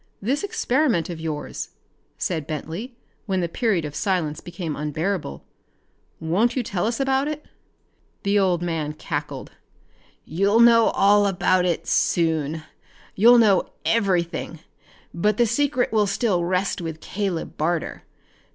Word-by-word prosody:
"This 265 +9 -1
experiment 270 - +1
of 165 - -7
yours," 155 -2 -5 0.5
said 160 -5 -2
Bentley 165 - -5 0.3
when 190 -2 0
the 170 - 0
period 190 -2 0
of 145 - -6
silence 170 -5 -1
became 175 -3 -5
unbearable, 150 - -3 0.4
" - - -42
won't 195 +10 +1
you 255 - 0
tell 200 -2 -1
us 230 +2 -2
about 270 +1 +1
it?" 305 0 -5 0.8
The 200 0 +2
old 180 -3 +1
man 160 -3 -2
cackled. - - -5 0.7
"You'll 200 +7 +2
know 230 -1 +7
all 205 0 +4
about 185 -1 +2
it 175 -2 -1
soon! 160 -2 +1 0.5
You'll 235 +5 +6
know 205 -5 +4 0.2
everything, 175 -6 0 0.5
but 210 +5 +1
the 240 - +4
secret 255 +2 +1
will 210 -2 +3
still 200 -3 +1
rest 185 +1 0
with 160 -2 -5
Caleb 190 -3 -3
Barter. 165 +1 -2
185 Hz, 135 wpm, -23 LUFS, 165-225 Hz, 0.8 s, know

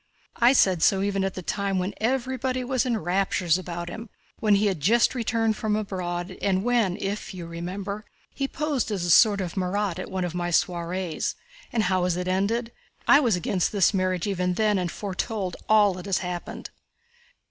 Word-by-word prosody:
I 240 +2 +5
said 185 -9 +3
so 195 +3 +4
even 200 -1 0
at 195 -1 -2
the 185 - -6
time 200 +1 -1
when 185 +2 -1
everybody 255 +1 -1
was 260 0 0
in 235 -2 +1
raptures 185 -1 +1
about 175 -1 -5
him, 220 +6 -7 0.3
when 210 -2 +4
he 200 +2 +2
had 190 -5 0
just 230 +10 +3
returned 225 -3 0
from 215 -2 0
abroad, 185 -3 -3
and 190 -1 +1
when, 230 -6 +1
if 195 0 -4
you 175 -2 -6
remember, 190 +5 -5 0.3
he 275 - -2
posed 290 -5 -1
as 195 -5 -2
a 175 - +1
sort 205 +2 +6
of 175 -3 -4
Marat 190 -1 -1
at - - -6
one 185 -1 -2
of 175 - -4
my 175 0 -2
soirees. 175 0 -1 0.4
And 230 -4 +1
how 185 -1 +1
has 180 -1 0
it 180 0 -3
ended? 215 +6 0 0.4
I 280 - +8
was 240 -9 +2
against 180 +1 0
this 200 -1 +3
marriage 185 -2 0
even 180 -3 -1
then 210 -1 +2
and 175 -2 -2
foretold 195 -1 -3
all 210 -2 +5
that 180 +2 -8
has 195 - +1
happened." 180 -1 -5
195 Hz, 190 wpm, -25 LUFS, 180-220 Hz, 0.4 s, I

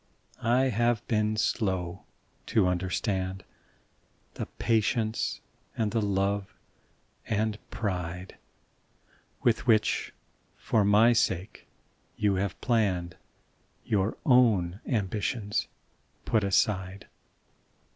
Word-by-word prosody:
I 125 +3 +3
have 120 -1 +1
been 110 -1 +1
slow 95 -5 -1 0.4
to 105 - +3
understand 95 +1 -1 0.9
The - - -5
patience 110 0 0 0.4
and 110 -2 0
the 115 - +1
love 100 0 -1 0.7
and 110 -1 0
pride 90 -3 -4 1.0
"With 120 +1 +2
which 110 -3 +2 0.5
for 110 - +1
my 105 +4 +5
sake 95 -3 -1 0.5
you 105 -2 +1
have 95 +1 -1
hour 95 0 -2
own 105 -8 +4
ambitions 105 -1 -1 0.6
put 110 -2 +2
aside. 95 0 0
105 Hz, 85 wpm, -28 LUFS, 95-110 Hz, 1.0 s, my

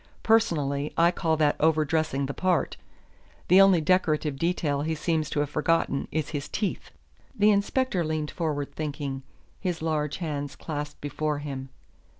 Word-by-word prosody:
Personally, 150 -11 +2
I 170 +1 +5
call 160 -3 0
that 150 -1 +3
over 155 0 +3
dressing 150 -2 0
the 140 - -4
part. 185 +1 0 0.7
The 185 +3 +8
only 195 -4 +6
decorative 155 -4 +1
detail 155 -4 0
he 160 +2 -1
seems 155 -1 -1
to 145 - 0
have 145 - -2
forgotten 155 -2 +1
is 155 -1 -2
his 145 -3 -4
teeth." 205 -3 -3 0.5
The 210 +1 +5
inspector 200 -1 +1
leaned 155 -1 -2
forward 145 -4 -3
thinking, 145 -3 -4 0.4
his 180 -4 -2
large 150 -2 -1
hands 145 -5 -4
clasped 150 -2 -6
before 150 +1 -2
him. 135 -2 -6
155 Hz, 150 wpm, -27 LUFS, 145-170 Hz, 0.7 s, The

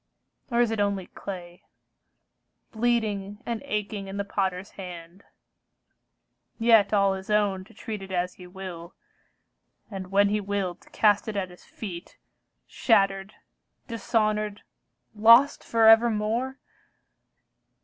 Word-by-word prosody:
Or 240 -1 +2
is 235 -2 +2
it 225 - -2
only 200 -2 0
clay, 175 -3 -9 1.1
Bleeding 215 -3 -1
and 235 -2 -3
aching 210 -4 -3
in 195 +1 -6
the 200 - -1
potter's 190 -1 -2
hand, 180 0 -10 1.3
Yet 225 -3 +5
all 200 -2 +3
his 190 +1 -8
own 205 -3 +1
to 225 - -19
treat 215 -1 -6
it 195 0 -9
as 180 0 -1
he 180 - -13
will, 180 -2 -9 1.0
And 190 -2 -6
when 200 +1 +4
he 210 0 0
will 200 -2 -2
to 175 - -23
cast 205 -1 +2
it 220 - -4
at 185 -2 -2
his 180 - -16
feet, 180 -6 -9 0.5
Shattered, 195 -2 +1 0.5
dishonored, 215 -2 -1 0.5
lost 230 +6 +6
for 225 -1 +3
evermore? 225 +3 +3
205 Hz, 125 wpm, -26 LUFS, 190-220 Hz, 1.3 s, lost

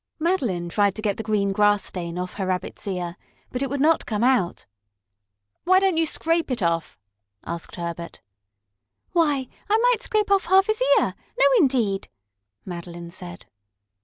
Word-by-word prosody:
Madeline 255 - 0
tried 200 +2 +1
to 215 - -5
get 205 -3 0
the - - -3
green 205 -2 0
grass 205 0 +3
stain 170 -2 -4
off 180 0 -4
her 190 -2 -2
Rabbit's 185 +2 -3
ear, 180 -2 -3 0.3
but 250 - -3
it 275 - -1
would 280 +1 -2
not 315 +3 +3
come 215 0 -1
out. 245 -9 +1 1.0
"Why 370 +1 +5
don't 385 -2 +2
you 325 0 +2
scrape 330 +1 0
it 245 -6 -2
off?" 165 - -1 0.5
asked 170 0 -6
Herbert. 170 -1 -6 0.9
"Why, 295 -7 +2 0.2
I 430 - +4
might 485 -1 +3
scrape 425 -1 0
off 395 -1 +3
half 385 +1 +5
his 435 +3 -1 0.2
ear! - - +1 0.3
No, - - +6
indeed!" 240 - +1 0.6
Madeline 170 -1 -7
said. 175 -1 -8
210 Hz, 160 wpm, -24 LUFS, -, 1.0 s, No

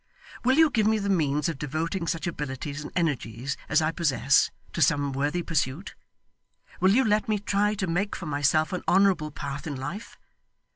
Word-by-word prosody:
Will 260 +3 +3
you 320 -2 +6
give 215 -4 +2
me 220 0 +3
the 200 -1 -1
means 150 -5 +1
of 160 -5 -4
devoting 165 +5 -3
such 165 - -2
abilities 145 -2 -4
and 150 - -8
energies 140 -6 -1
as 155 0 +3
I 155 - +1
possess, 145 -4 +2 0.2
to 170 - -3
some 145 -1 +2
worthy 145 +6 -1
pursuit? 155 +2 -2 0.9
Will 190 +1 +4
you 265 - +4
let 215 0 +1
me 215 - +2
try 205 +1 0
to 195 - -2
make 190 +4 -1
for - - -7
myself 150 +2 +1
an 180 - -2
honourable 185 -5 +3
path 140 0 -6
in 145 - -4
life? 170 - -7
165 Hz, 185 wpm, -26 LUFS, 145-195 Hz, 0.9 s, you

